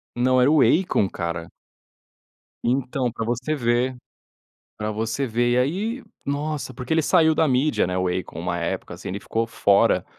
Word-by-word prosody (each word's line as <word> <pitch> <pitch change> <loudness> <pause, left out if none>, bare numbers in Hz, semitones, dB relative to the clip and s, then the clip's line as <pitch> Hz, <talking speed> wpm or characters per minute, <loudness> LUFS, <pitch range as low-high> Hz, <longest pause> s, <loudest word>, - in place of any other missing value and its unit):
Não, 130 +1 +3
era 125 +3 +5
o 155 -1 +5
Akon, 160 - +3
cara. 85 -2 -4 1.2
Então, 125 0 0
pra 115 - -4
você 125 +6 -1
ver. 125 -1 0 0.8
Pra 105 0 -3
você 115 +5 -2
ver. 120 +1 +1
E 125 - +3
aí, 200 - -1 0.2
nossa, 145 0 -3
porque 125 +3 -5
ele 160 0 +3
saiu 160 0 +4
da 160 - +3
mídia, 135 -1 +2
né, 90 0 -2
o 95 0 0
Akon, 90 -2 -4
uma 85 0 -2
época, 85 - -3
assim, - - -8
ele 100 +2 -4
ficou 115 +2 -2
fora. 100 -3 +3
125 Hz, 170 wpm, -23 LUFS, 105-145 Hz, 1.2 s, era